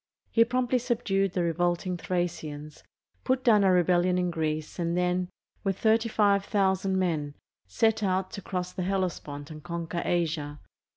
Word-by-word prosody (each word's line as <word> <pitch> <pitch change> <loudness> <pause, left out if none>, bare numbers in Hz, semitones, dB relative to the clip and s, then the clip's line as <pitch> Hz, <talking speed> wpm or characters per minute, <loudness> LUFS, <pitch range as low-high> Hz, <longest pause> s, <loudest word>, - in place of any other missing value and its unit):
He 230 - +6
promptly 250 +1 +1
subdued 195 -6 0
the 180 - 0
revolting 175 +2 0
Thracians, 155 -4 -4 0.4
put 260 0 +1
down 215 -4 +5
a 190 - +5
rebellion 180 0 +3
in 180 -1 0
Greece, 155 0 -3
and 170 0 0
then, 180 0 0 0.3
with 195 -2 -1
35,000 200 -3 +2
men, 155 -6 -1 0.3
set 220 - +1
out 190 -1 0
to 200 - -6
cross 180 -1 -4
the - - -4
Hellespont 175 -6 -3
and 155 -1 -10
conquer 170 0 -4
Asia. 155 -4 -1
180 Hz, 140 wpm, -28 LUFS, 170-195 Hz, 0.4 s, He